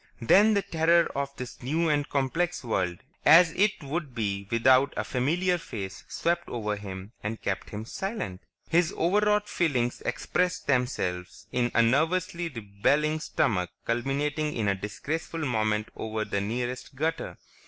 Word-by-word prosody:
Then 205 - +5
the 200 - +2
terror 165 +1 +3
of 140 0 -2
this 125 -1 -8
new 160 +7 0
and 145 -2 +1
complex 165 +6 0
world 90 -7 -1 0.2
as 165 +2 +8
it 200 -2 +1
would 145 -2 -4
be 100 -3 -2
without 130 +4 +4
a - - 0
familiar 175 +8 +1
face 100 - -7
swept 170 +1 -1
over 105 -3 -2
him 100 0 -8
and 110 +2 -4
kept - - -3
him 105 +1 -6
silent. 190 - -4 0.3
His 170 0 +3
overwrought 210 +4 +2
feelings 130 -11 0
expressed 180 0 -1
themselves 95 -10 -1
in 120 -1 +1
a 115 - +6
nervously 165 +7 +1
rebelling 140 +7 0
stomach, 90 - 0 0.2
culminating 145 +5 -1
in 110 -3 0
a 100 - +3
disgraceful 150 - -4
moment 110 -4 0
over 110 -1 -3
the 100 - -1
nearest 120 +5 -3
gutter. 160 +4 -2
135 Hz, 145 wpm, -27 LUFS, 110-165 Hz, 0.3 s, as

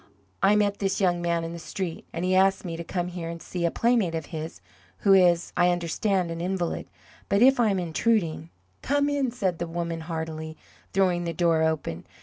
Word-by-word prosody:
"I 205 - +5
met 205 -1 +1
this 195 -1 0
young 175 -3 +2
man 170 -1 0
in 165 0 -5
the 170 - -7
street, 175 0 -5
and 170 +2 -3
he 185 - +1
asked 190 +1 +3
me 170 -2 -4
to 170 - -5
come 175 +1 -3
here 175 -2 -5
and 170 0 -6
see 175 +1 -3
a - - +3
playmate 230 -5 +1
of 160 -2 -3
his 160 0 -5 0.4
who 195 - +5
is, 175 -3 +4
I 175 0 +4
understand, 175 +1 0
an 165 0 -4
invalid. 180 -1 -2 0.4
But 200 +4 +4
if 265 0 +6
I 230 -3 +4
am 195 - +1
intruding 170 -1 0 0.2
" 90 +1 -40
"Come 285 +1 +1
in," 285 -3 0
said 195 -8 -2
the 175 - -2
woman, 170 0 -3
heartily, 160 -1 -5 0.3
throwing 180 -2 +2
the 170 - -2
door 165 -2 +2
open. 160 - -1
175 Hz, 210 wpm, -26 LUFS, 165-195 Hz, 0.4 s, if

